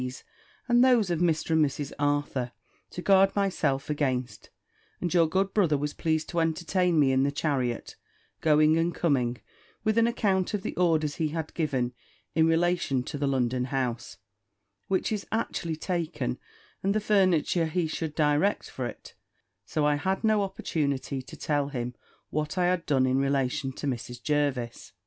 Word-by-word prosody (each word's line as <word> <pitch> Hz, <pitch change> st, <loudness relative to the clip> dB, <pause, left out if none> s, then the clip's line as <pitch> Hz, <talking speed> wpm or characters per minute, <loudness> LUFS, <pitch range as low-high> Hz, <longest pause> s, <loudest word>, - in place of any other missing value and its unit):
's, 125 Hz, +1 st, -6 dB, 0.4 s
and 240 Hz, 0 st, +5 dB
those 240 Hz, -8 st, +4 dB
of 170 Hz, -, 0 dB
Mr. 165 Hz, -2 st, +1 dB
and 160 Hz, -1 st, +4 dB
Mrs. 145 Hz, 0 st, -2 dB
Arthur, 145 Hz, -4 st, 0 dB, 0.4 s
to 180 Hz, -, -7 dB
guard 195 Hz, 0 st, +5 dB
myself 185 Hz, -9 st, 0 dB
against: 130 Hz, -4 st, -2 dB, 0.5 s
and 175 Hz, -1 st, -2 dB
your 170 Hz, -2 st, +5 dB
good 190 Hz, +3 st, 0 dB
brother 170 Hz, -8 st, +3 dB
was 145 Hz, +1 st, -3 dB
pleased 160 Hz, -1 st, -1 dB
to 170 Hz, -, -1 dB
entertain 170 Hz, +1 st, +1 dB
me 140 Hz, -2 st, +4 dB
in 130 Hz, 0 st, +3 dB
the 140 Hz, +1 st, +2 dB
chariot, 135 Hz, -5 st, -2 dB, 0.5 s
going 155 Hz, 0 st, +4 dB
and 170 Hz, +1 st, 0 dB
coming, 125 Hz, -7 st, +1 dB, 0.4 s
with 215 Hz, +1 st, +2 dB
an 230 Hz, -, +4 dB
account 200 Hz, -4 st, +1 dB
of 200 Hz, -, -4 dB
the -, -, -4 dB
orders 160 Hz, -4 st, +1 dB
he 160 Hz, -, +1 dB
had 155 Hz, 0 st, -4 dB
given 130 Hz, -7 st, -1 dB, 0.4 s
in 160 Hz, 0 st, +4 dB
relation 165 Hz, -5 st, +1 dB
to 130 Hz, -, -6 dB
the 145 Hz, 0 st, -1 dB
London 125 Hz, -2 st, 0 dB
house, 125 Hz, -7 st, -3 dB, 0.7 s
which 190 Hz, +2 st, 0 dB
is 210 Hz, -2 st, -3 dB
actually 190 Hz, -7 st, -2 dB
taken, 155 Hz, -7 st, -3 dB, 0.4 s
and 195 Hz, +2 st, 0 dB
the -, -, +3 dB
furniture 185 Hz, -5 st, +2 dB
he 170 Hz, +2 st, 0 dB
should 160 Hz, -1 st, -4 dB
direct 150 Hz, +6 st, +1 dB
for 130 Hz, -2 st, -3 dB
it; -, -, -10 dB, 0.5 s
so 155 Hz, -, -1 dB
that -, -, +3 dB
I 150 Hz, -, +3 dB
had 190 Hz, +7 st, -1 dB
no 215 Hz, -1 st, +3 dB
opportunity 145 Hz, -8 st, -2 dB
to 130 Hz, -, -12 dB
tell 145 Hz, -2 st, 0 dB
him 125 Hz, -3 st, -4 dB, 0.4 s
what 155 Hz, +3 st, -2 dB
I 180 Hz, -, +3 dB
had 180 Hz, -1 st, 0 dB
done 135 Hz, -3 st, +3 dB
in 130 Hz, +1 st, +2 dB
relation 135 Hz, -1 st, 0 dB
to -, -, -6 dB
Mrs. 125 Hz, -2 st, -4 dB
Jervis. 140 Hz, -6 st, -1 dB
155 Hz, 170 wpm, -27 LUFS, 135-180 Hz, 0.7 s, and